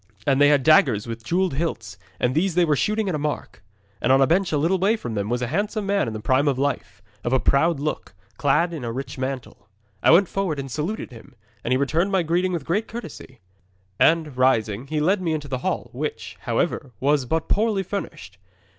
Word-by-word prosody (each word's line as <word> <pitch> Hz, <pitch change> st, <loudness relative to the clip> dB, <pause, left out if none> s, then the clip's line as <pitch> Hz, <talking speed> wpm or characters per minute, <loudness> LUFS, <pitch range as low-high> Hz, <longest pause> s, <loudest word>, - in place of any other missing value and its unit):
And 140 Hz, -1 st, +2 dB
they 145 Hz, -, +7 dB
had 145 Hz, -3 st, +3 dB
daggers 135 Hz, -, +4 dB
with 115 Hz, -1 st, -6 dB
jewelled 180 Hz, +6 st, 0 dB
hilts, 160 Hz, +4 st, -3 dB, 0.2 s
and 125 Hz, -, +1 dB
these 170 Hz, +4 st, +1 dB
they 175 Hz, -1 st, +4 dB
were 150 Hz, -2 st, +2 dB
shooting 215 Hz, +7 st, 0 dB
at 185 Hz, -, -1 dB
a 150 Hz, -, -1 dB
mark. 145 Hz, -, -4 dB, 0.4 s
'And -, -, +2 dB
on 135 Hz, -, +6 dB
a 135 Hz, -, +6 dB
bench 180 Hz, +5 st, +1 dB
a 150 Hz, -, +1 dB
little 170 Hz, +6 st, +1 dB
way 200 Hz, +5 st, +3 dB
from 120 Hz, -, -6 dB
them 100 Hz, -1 st, -2 dB
was 120 Hz, +1 st, -1 dB
a -, -, -1 dB
handsome 210 Hz, +3 st, -1 dB
man 200 Hz, -6 st, +1 dB
in 115 Hz, -, -4 dB
the 110 Hz, -, -5 dB
prime 130 Hz, +6 st, +2 dB
of 135 Hz, -3 st, +1 dB
life, 130 Hz, -8 st, -3 dB, 0.2 s
of 120 Hz, -, -1 dB
a 130 Hz, -, +4 dB
proud 150 Hz, +4 st, +2 dB
look, 145 Hz, -9 st, -4 dB, 0.2 s
clad 165 Hz, +5 st, +2 dB
in 155 Hz, -6 st, -6 dB
a 115 Hz, -, -3 dB
rich 130 Hz, +2 st, -6 dB
mantle. 130 Hz, -5 st, -5 dB, 0.3 s
'I -, -, +4 dB
went 185 Hz, +2 st, +6 dB
forward 190 Hz, -6 st, -2 dB
and 135 Hz, -1 st, -5 dB
saluted 160 Hz, -, -3 dB
him, 125 Hz, +3 st, -14 dB, 0.3 s
and -, -, -3 dB
he 130 Hz, -, +4 dB
returned 160 Hz, +8 st, +1 dB
my 190 Hz, -3 st, +2 dB
greeting 175 Hz, +3 st, +1 dB
with 165 Hz, -6 st, -3 dB
great 205 Hz, +6 st, 0 dB
courtesy. 160 Hz, -, -9 dB, 0.6 s
And, 160 Hz, -4 st, +3 dB
rising, 120 Hz, -2 st, +1 dB
he 155 Hz, +1 st, -1 dB
led 185 Hz, +6 st, +2 dB
me 165 Hz, -3 st, 0 dB
into 150 Hz, -2 st, -4 dB
the 130 Hz, -2 st, -3 dB
hall, -, -, -3 dB
which, -, -, -5 dB
however, 130 Hz, -3 st, -2 dB
was 140 Hz, 0 st, +2 dB
but 160 Hz, +4 st, -1 dB
poorly 210 Hz, -2 st, +1 dB
furnished. 200 Hz, +2 st, -6 dB
150 Hz, 225 wpm, -23 LUFS, 130-180 Hz, 0.6 s, they